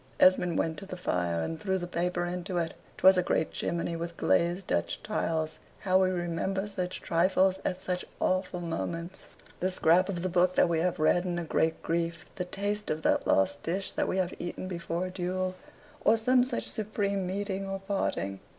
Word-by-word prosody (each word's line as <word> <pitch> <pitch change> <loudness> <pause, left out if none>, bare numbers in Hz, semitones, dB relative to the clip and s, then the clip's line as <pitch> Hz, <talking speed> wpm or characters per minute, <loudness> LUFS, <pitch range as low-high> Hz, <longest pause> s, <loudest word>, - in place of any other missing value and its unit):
Esmond 180 -2 +5
went 160 -2 0
to 195 - -10
the 180 - -6
fire, 85 - 0
and 160 - -4
threw 190 0 0
the 175 - -3
paper 175 0 -1
into 180 +1 -3
it. 165 -2 -1 0.2
'Twas 190 0 +7
a - - +4
great 160 -2 0
chimney 170 0 -2
with 170 0 -5
glazed 175 +2 +2
Dutch - - -1
tiles. 160 -7 -1 0.2
How 190 -1 +3
we 185 - +3
remember 185 +2 -1
such 185 -3 -4
trifles 185 +2 +3
at 185 0 -2
such 180 -1 -2 0.2
awful 185 -1 0
moments! 170 +1 -4 0.3
the 185 - +1
scrap 185 +1 +4
of 175 -3 -2
the - - +1
book 180 0 +3
that - - +5
we 165 -1 +1
have 180 +1 +1
read 155 +3 +3
in 175 -2 -2
a 175 - -2
great 160 0 0
grief 170 0 -1
the 180 - -3
taste 205 +3 -2
of 155 0 -2
that - - +2
last 120 +10 +2
dish 185 +4 -2
that - - -1
we - - -1
have 185 -1 0
eaten 175 +1 -4
before 170 -1 -3
a 185 - -5
duel, 185 0 -2 0.5
or 225 - +5
some 250 +3 +4
such 250 -1 -2
supreme 200 -3 -1
meeting 195 0 -2
or 195 0 -3
parting. 190 - -2
180 Hz, 195 wpm, -29 LUFS, 170-190 Hz, 0.5 s, Twas